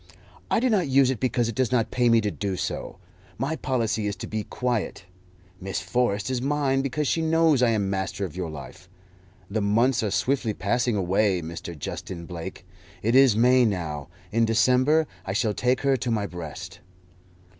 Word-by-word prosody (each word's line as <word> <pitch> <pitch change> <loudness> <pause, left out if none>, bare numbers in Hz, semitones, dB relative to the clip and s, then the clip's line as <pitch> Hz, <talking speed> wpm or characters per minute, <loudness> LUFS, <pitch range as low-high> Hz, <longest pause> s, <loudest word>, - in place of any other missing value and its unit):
"I - - +3
do 255 - +2
not 200 - +2
use 135 -1 +4
it 125 - -4
because 125 -2 +1
it 115 - -3
does 130 +2 0
not 120 -3 +1
pay 125 -1 +2
me 115 -1 +5
to 105 -1 -1
do 95 -2 -3
so. - - -4 0.4
My 135 +6 -1
policy 115 -7 -1
is 100 - -2
to 95 - -7
be 110 -1 -3
quiet. 120 -7 -2 0.5
Miss 95 +1 -3
Forrest 120 -2 0
is 125 -2 -1
mine 135 -1 +1
because 140 +2 -1
she 165 - +1
knows 160 -3 +3
I 125 - +4
am 105 -3 +1
master 95 0 -2
of 90 - -8
your 90 -3 -3
life. 80 +4 -10 0.6
The 105 +3 -2
months 115 +6 +2
are 110 - 0
swiftly 120 +1 0
passing 120 +4 0
away, 95 -1 +1
Mr. 85 0 -7
Justin 85 +4 -6
Blake. 90 +1 -7 0.4
It 115 +3 +1
is 130 -4 +6
May 125 +2 +5
now; 80 -9 -2 0.2
in 115 +2 +2
December 125 +7 +3 0.2
I 95 - -4
shall 110 +1 +1
take 125 +4 +1
her 135 -1 +3
to 125 -1 -3
my 110 -3 0
breast." 90 -1 -8
115 Hz, 190 wpm, -25 LUFS, 95-130 Hz, 0.6 s, is